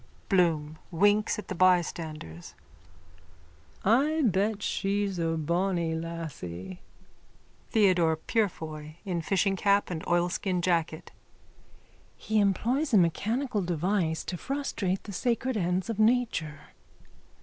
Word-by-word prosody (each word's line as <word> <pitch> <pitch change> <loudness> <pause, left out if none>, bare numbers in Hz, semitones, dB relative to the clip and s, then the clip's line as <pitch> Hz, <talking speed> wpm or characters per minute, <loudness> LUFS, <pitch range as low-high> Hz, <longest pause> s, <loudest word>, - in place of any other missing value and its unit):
BLOOM: 160 -5 +1
(Winks 205 +6 +2
at 210 - -7
the - - -4
bystanders.) 160 - 0 1.3
I 290 +9 +3
bet 205 0 +1
she's 200 -1 -1
a 165 -1 0
bonny 170 +1 0
lassie. 145 - -6 0.9
THEODORE 180 -7 +3
PUREFOY: 155 -6 -3
(In 175 -3 -2
fishingcap 195 +3 +1
and 160 -2 -4
oilskin 175 +1 0
jacket.) 165 -3 -1 1.1
He 215 0 0
employs 235 - +1
a - - +8
mechanical 215 - +1
device 175 -1 0
to 180 - -5
frustrate 215 -7 -2
the 205 - -8
sacred 245 +4 -1
ends 180 -1 0
of 225 -2 -4
nature. 215 -10 0
185 Hz, 105 wpm, -28 LUFS, 165-210 Hz, 1.3 s, a